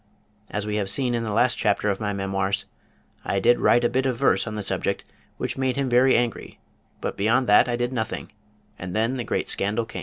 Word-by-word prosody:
As 105 0 -3
we 105 0 -2
have 100 -2 -1
seen 125 +2 +1
in 115 -1 -1
the 110 - -3
last 120 +4 +2
chapter 105 0 +1
of 100 -2 0
my 105 -2 -2
memoirs, 95 0 -1 0.6
I 100 - -1
did 120 +4 +4
write 120 - +4
a - - +4
bit 130 +2 0
of 125 -2 -1
verse 135 -2 +2
on 110 - -4
the 105 - -3
subject - - -1 0.3
which - - -4
made 130 -1 0
him 140 -2 -1
very 125 +2 +5
angry, 120 -1 -3 0.4
but - - -3
beyond 115 +6 +2
that 115 +3 +5
I 120 - +1
did 120 +1 -2
nothing, 110 -3 -4 0.5
and 90 +1 -6
then 115 +4 0
the 120 - -2
great - - -2
scandal 110 +3 -1
came! 95 - -7
115 Hz, 225 wpm, -24 LUFS, 105-125 Hz, 0.6 s, very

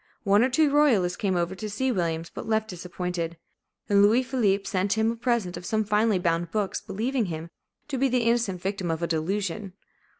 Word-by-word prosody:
One 205 +1 +4
or 255 - +2
two 290 +3 +3
royalists 235 -12 +3
came 190 -1 -1
over 175 +1 0
to 210 +3 -6
see 260 +6 0
Williams, 165 -5 -2
but - - -7
left 220 0 +1
disappointed; 180 -2 -4 0.5
and 200 -1 +4
Louis 220 +5 +5
Philippe 220 -7 +1
sent 190 +2 0
him 220 +1 +1
a - - -4
present 235 -6 -1
of - - -8
some 220 0 +1
finely 210 0 +2
bound 170 -1 0
books, 205 0 -2
believing 225 +5 -1
him 165 -1 -6 0.4
to 275 -3 -3
be 270 +1 +3
the 250 -1 +1
innocent 230 -6 +1
victim 195 -2 -2
of 165 +1 -2
a - - +1
delusion. 190 +4 -2
200 Hz, 200 wpm, -26 LUFS, 180-230 Hz, 0.5 s, Louis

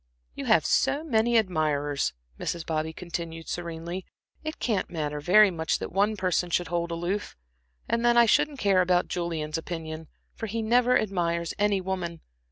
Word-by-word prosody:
"You - - -6
have - - +4
so 295 - +2
many 235 -5 +2
admirers," 150 - 0 0.3
Mrs. 170 -2 -3
Bobby 160 0 -1
continued 165 -1 -6
serenely, 170 +1 -5 0.4
"it 310 0 -4
can't 215 -6 -1
matter 150 -3 -3
very 195 +6 +6
much 160 -2 0
that - - -6
one 205 +3 +1
person 180 -1 0
should 175 0 0
hold 170 0 -1
aloof. 175 +5 -3 0.5
And 235 0 0
then 240 0 +4
I 235 - +8
shouldn't 295 +5 +2
care 195 -6 +3
about 180 0 +2
Julian's 165 -3 -2
opinion, 160 -1 -6 0.3
for 225 - -5
he 225 +2 -2
never 245 +2 +4
admires 170 -4 -1
any 205 -2 +2
woman. 180 -3 -4
175 Hz, 165 wpm, -27 LUFS, 165-215 Hz, 0.5 s, I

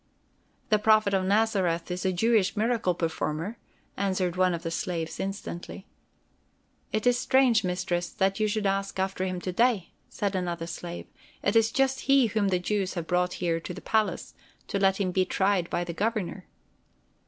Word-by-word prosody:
"The 215 - +4
Prophet 215 -1 +4
of 190 -1 +2
Nazareth 190 -5 +1
is 180 +1 -3
a - - +2
Jewish 215 +2 +2
miracle 220 -5 +1
performer," 165 +4 -3 0.4
answered 185 -3 0
one 185 -1 +2
of 170 - -7
the 165 - -3
slaves 165 -1 -3
instantly. 195 -1 -5 1.1
"It 215 - -1
is 245 0 +4
strange, 255 -3 +4
Mistress, 175 -1 -1
that 195 +2 0
you 215 - +2
should 210 0 -1
ask 195 0 -1
after 190 0 -1
him 185 -1 -3
to 185 - -3
day," 225 -2 +1 0.2
said 200 -1 -2
another 175 -2 -2
slave. 170 0 -6 0.4
"It - - +1
is 225 0 +4
just 270 0 +1
he 275 -2 +6
whom 215 -2 0
the 185 -2 +2
Jews 195 +1 -1
have 170 -2 -3
brought 180 +1 +1
here 170 -2 -1
to 155 - -7
the - - -7
palace, 220 -1 -1 0.4
to 200 - -1
let 195 0 +3
him 185 -2 0
be 185 +1 +2
tried 190 -2 +1
by 175 - -1
the 170 -1 -5
Governor." 200 -2 -2
190 Hz, 175 wpm, -27 LUFS, 180-215 Hz, 1.1 s, he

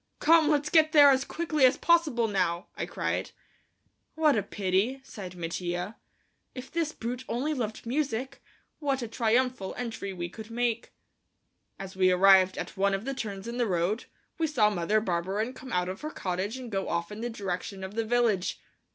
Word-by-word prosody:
"Come, 325 -1 +5
let's 295 -1 +1
get 315 -1 +5
there 290 -2 +9
as 265 0 +2
quickly 310 -3 -1
as 260 +2 +6
possible 305 -9 +3
now," 185 -3 0
I - - -3
cried. - - -2 0.9
"What 310 -3 +4
a 215 - +2
pity," 200 +5 0
sighed 190 -8 -9
Mattia. 175 +3 -3 0.6
"If 255 0 -8
this 330 -2 -1
brute 245 -1 -5
only 275 +6 -1
loved 225 -6 -4
music, 265 0 -2 0.4
what 275 -4 -1
a - - -3
triumphal 230 -2 0
entry 230 -5 -4
we 175 -2 -4
could 220 +5 -10
make." 235 0 -1 0.9
As 195 -1 -8
we 185 -1 +4
arrived 190 0 +6
at - - -5
one 195 0 +2
of 195 +4 -5
the 275 - -2
turns 205 -6 -5
in 235 +1 -4
the 240 -2 +1
road, 185 +5 0 0.3
we 325 - +2
saw 220 -8 +3
Mother 205 +3 +1
Barberin 195 +5 -1
come 260 -1 -10
out 180 0 +1
of 185 +1 -5
her 305 - -4
cottage 195 - -3
and 250 -3 -8
go 195 -1 -2
off 170 +1 -2
in 210 +2 -7
the 240 - -2
direction 195 -2 -4
of 190 +1 -6
the 225 +1 0
village. 220 -5 +1
225 Hz, 185 wpm, -28 LUFS, 190-260 Hz, 0.9 s, there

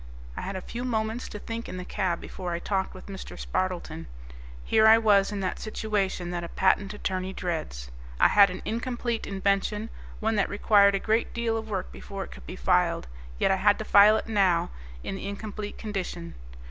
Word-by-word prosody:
I - - -5
had 195 - -4
a 185 - -4
few 240 +5 -6
moments 225 -1 -2
to - - -6
think 230 +2 -6
in 185 - -6
the 180 - -6
cab 185 -4 -1
before 180 -2 -5
I - - -1
talked 190 +2 -2
with 185 - -11
Mr. 195 -2 -8
Spardleton. 175 -3 -3 0.6
Here 220 - +4
I 220 +1 +9
was 205 -3 +4
in 205 -1 -3
that 185 - -2
situation 200 -5 -2
that 175 -1 -3
a 170 - -5
patent 195 +1 +2
attorney 190 -2 -3
dreads. 155 - -4 0.3
I - - +7
had 200 -2 +7
an 180 +1 -7
incomplete 235 0 -2
invention, 200 +3 0 0.3
one 220 0 0
that 200 - +2
required 200 -1 +5
a - - +1
great 220 +3 0
deal 235 -1 0
of 220 0 -4
work 190 -3 -3
before 195 -1 -6
it - - -11
could - - -12
be - - -6
filed, - - +2 0.3
yet - - +2
I 190 - +3
had 205 +2 +4
to 220 - -5
file 210 +2 +7
now 195 - +2 0.3
in 195 - -4
the 195 - -6
incomplete 205 +1 -6
condition. 185 -5 -5
200 Hz, 200 wpm, -27 LUFS, 185-220 Hz, 0.6 s, I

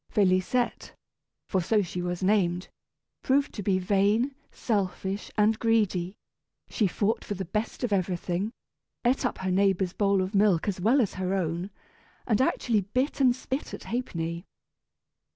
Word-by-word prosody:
Félisette, 200 +4 +1 0.5
for 190 - +1
so 210 +4 +2
she 180 0 -4
was 175 +1 -3
named, 185 -3 +1 0.5
proved 275 +1 +1
to 210 - -5
be 195 -1 +2
vain, 205 +7 +2 0.2
selfish, 195 -2 -2
and 215 +1 +3
greedy; 205 -5 +1 0.5
she 215 - +1
fought 215 +5 0
for 205 - -4
the 190 0 -4
best 210 +7 -3
of 235 -4 0
everything, 185 +1 -1 0.5
ate 250 +1 +3
up - - -6
her 190 0 -2
neighbor's 190 -1 +2
bowl 200 -2 +2
of 185 +3 -5
milk 200 -4 +3
as 190 -3 -2
well 245 +8 +4
as 210 - -1
her 185 +1 -1
own, 175 0 -2 0.6
and 220 0 +2
actually 235 -4 +1
bit 255 +9 -1
and 250 -2 +5
spit 265 +2 -4
at - - -11
Ha'penny. 170 -8 -3
200 Hz, 150 wpm, -27 LUFS, 185-225 Hz, 0.6 s, and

